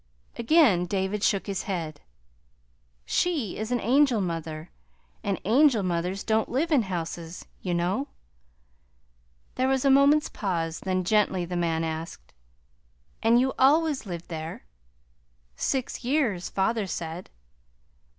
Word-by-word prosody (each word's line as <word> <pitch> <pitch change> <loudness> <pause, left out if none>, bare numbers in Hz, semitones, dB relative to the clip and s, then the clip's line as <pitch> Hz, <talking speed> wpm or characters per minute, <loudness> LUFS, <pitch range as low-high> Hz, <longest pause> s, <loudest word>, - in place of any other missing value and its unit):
Again 230 - +4
David 195 +2 -1
shook 200 -2 +2
his 200 -2 -3
head. 165 -5 -4 1.0
"She 300 - 0
is 220 +2 -4
an 245 - +1
angel 255 +1 +3
mother, 165 -3 -4 0.5
and 200 -2 -1
angel 240 0 +4
mothers 180 +2 -2
don't 220 0 +1
live 310 +7 0
in 285 -5 +5
houses, 170 -3 -5 0.2
you 180 -2 -1
know." 185 +11 0 1.5
There 255 - 0
was 265 0 +1
a 275 - +5
moment's 280 +2 +5
pause; 165 -5 -3
then 185 -1 -1
gently 190 -2 +2
the 180 +1 -5
man 165 -2 0
asked: 160 - -6 0.9
"And 230 +2 +5
you 265 +1 +1
always 290 -2 +3
lived 175 -2 -6
there?" 160 - -6 0.9
"Six 260 - -2
years, 240 - 0
father 205 +1 0
said." 170 0 -5
195 Hz, 125 wpm, -26 LUFS, 175-255 Hz, 1.5 s, in